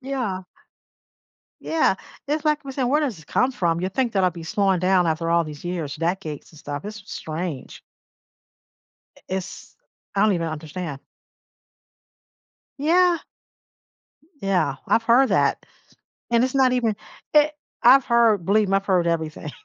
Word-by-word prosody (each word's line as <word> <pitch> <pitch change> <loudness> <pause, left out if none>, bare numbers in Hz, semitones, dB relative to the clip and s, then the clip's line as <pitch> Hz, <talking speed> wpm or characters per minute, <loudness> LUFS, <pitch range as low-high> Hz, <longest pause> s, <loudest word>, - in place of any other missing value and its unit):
Yeah. 250 -8 -3 1.2
Yeah, 320 -11 +2 0.3
it's 300 +2 -1
like 300 -1 +1
we're 270 - -6
say 265 0 -2
"Where 280 +5 +2
does 270 -9 -1
this 160 - -15
come 255 - +1
from?" 170 -7 0
You 185 - -1
think 240 +3 -1
that 195 -2 +2
I'll 180 - +3
be 170 0 -9
slowing 190 +1 +1
down 185 -1 +3
after 165 +1 -1
all 170 0 +3
these 150 +1 -9
years, 170 -5 -3
decades 165 -2 -3
and 155 - -15
stuff. 145 +3 -6
It's 210 +1 -6
s - - -17
strange. 160 -4 -6 1.4
Eh - - -19 0.2
is 190 -1 -8 0.4
I 200 - +2
don't 215 -1 +4
even 170 -2 -1
understand. 155 -1 -6 1.8
Yeah. 345 +4 +3 1.2
Yeah, 185 -8 +1
I've 230 - +3
heard 245 +3 +4
that, - - +2 0.7
and 235 0 +4
it's 260 +1 -1
not 260 -2 +4
even 235 -4 +1 0.4
it 300 0 +6 0.3
I've 270 -1 +7
heard 230 -6 +3
believe 210 +2 +3
me, 195 - +3
I've 195 - -4
heard 185 -3 +2
everything. 160 -2 -2
195 Hz, 155 wpm, -23 LUFS, 170-250 Hz, 1.8 s, I've